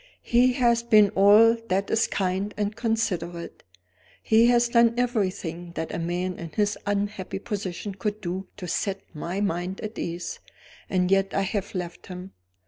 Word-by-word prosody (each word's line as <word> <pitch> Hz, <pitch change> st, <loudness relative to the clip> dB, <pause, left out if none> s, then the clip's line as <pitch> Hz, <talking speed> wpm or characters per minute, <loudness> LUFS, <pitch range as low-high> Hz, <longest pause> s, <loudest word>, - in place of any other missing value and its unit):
"He 250 Hz, +2 st, +4 dB
has 235 Hz, -2 st, +3 dB
been 215 Hz, -3 st, +5 dB
all 210 Hz, +4 st, +6 dB
that 195 Hz, +2 st, 0 dB
is 225 Hz, +1 st, +3 dB
kind 190 Hz, +2 st, -2 dB
and 210 Hz, 0 st, -1 dB
considerate: 185 Hz, -8 st, -2 dB, 0.6 s
he 225 Hz, +2 st, +5 dB
has 240 Hz, 0 st, +4 dB
done 235 Hz, -1 st, +4 dB
everything 185 Hz, -8 st, -2 dB
that 160 Hz, -, -4 dB
a -, -, -2 dB
man 175 Hz, +2 st, -2 dB
in 170 Hz, -, -6 dB
his 205 Hz, +6 st, 0 dB
unhappy 205 Hz, -2 st, -2 dB
position 200 Hz, -1 st, -4 dB
could 210 Hz, +2 st, -3 dB
do 185 Hz, 0 st, -4 dB
to 185 Hz, -3 st, -6 dB
set 195 Hz, +3 st, -2 dB
my 175 Hz, +5 st, -4 dB
mind 180 Hz, -1 st, -2 dB
at 215 Hz, +1 st, -6 dB
ease. 175 Hz, +1 st, -4 dB, 0.5 s
And 185 Hz, 0 st, +1 dB
yet 195 Hz, 0 st, +2 dB
I 195 Hz, -, +2 dB
have 200 Hz, +1 st, -3 dB
left 175 Hz, -2 st, -5 dB
him. 185 Hz, 0 st, -8 dB
195 Hz, 160 wpm, -25 LUFS, 180-220 Hz, 0.6 s, all